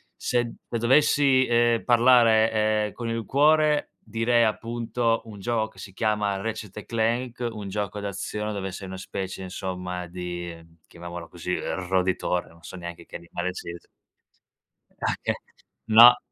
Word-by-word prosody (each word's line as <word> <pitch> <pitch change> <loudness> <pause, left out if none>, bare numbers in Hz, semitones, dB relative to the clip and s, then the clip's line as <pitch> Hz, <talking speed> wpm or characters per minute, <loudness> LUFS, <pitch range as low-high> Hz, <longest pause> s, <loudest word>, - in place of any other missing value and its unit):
se 120 -1 -1 0.2
dovessi 130 +2 +4
eh 120 -1 +3
parlare 110 -3 +4
eh - - -13
con 120 -1 -5
il 115 -1 -3
cuore, 150 +3 +3
direi 115 +2 +2
appunto 115 +1 0
un 105 -3 -10
gioco 110 +1 0
che 110 - -22
si 95 - -9
chiama 105 -1 0
Ratchet& 105 -1 -5
Clank, 120 +2 -1
un 105 -3 -7
gioco 105 0 -3
d'azione 100 +1 -4
dove 95 -1 -4
sei 95 +1 -7
una 95 0 -7
specie, 95 0 -5
insomma, 90 -1 -5
di 85 -1 -6 0.3
chiamiamolo 85 0 -8
così 90 +2 -4
eh - - -3
roditore, 90 -1 0
non 85 0 -20
so - - -9
neanche 85 -1 -8
che - - -12
animale 85 +1 -4
sia 85 - -6
es 85 - -14 1.1
Ah - - 0
che - - 0 0.5
no 120 +2 +9
105 Hz, 145 wpm, -25 LUFS, 95-120 Hz, 1.1 s, no